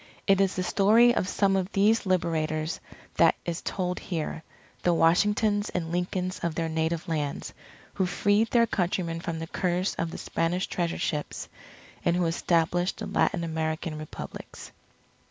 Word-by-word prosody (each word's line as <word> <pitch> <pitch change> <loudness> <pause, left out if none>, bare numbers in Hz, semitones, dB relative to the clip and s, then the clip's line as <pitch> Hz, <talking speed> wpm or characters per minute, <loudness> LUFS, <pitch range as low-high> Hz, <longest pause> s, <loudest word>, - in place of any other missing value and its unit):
It 195 -1 +4
is 195 -1 +2
the 185 - -1
story 220 +6 +5
of 185 - 0
some 195 -1 +2
of 190 +1 -1
these 210 +1 +3
Liberators 160 -3 0 0.4
that - - +5
is 170 -1 -3
told 180 -2 -2
here, 160 -2 -4 0.4
the 175 -1 +2
Washingtons 205 +5 +3
and 165 -2 -3
Lincolns 180 +1 -2
of 170 -2 -2
their 165 -1 -1
native 160 +1 -1
lands, 150 -4 -3 0.4
who 190 -2 0
freed 205 +5 +2
their 235 -1 +4
countrymen 175 -5 -1
from 165 -1 -4
the 160 - -4
curse 180 +3 -1
of 165 - 0
the - - -7
Spanish 175 +3 -1
Treasure 170 -2 -2
Ships, 150 -2 -3 0.6
and 170 - +2
who 180 -1 +1
established 170 +1 +1
the - - -5
Latin 175 -5 +1
American 160 -1 -2
Republics. 155 - -8
175 Hz, 155 wpm, -27 LUFS, 165-195 Hz, 0.6 s, story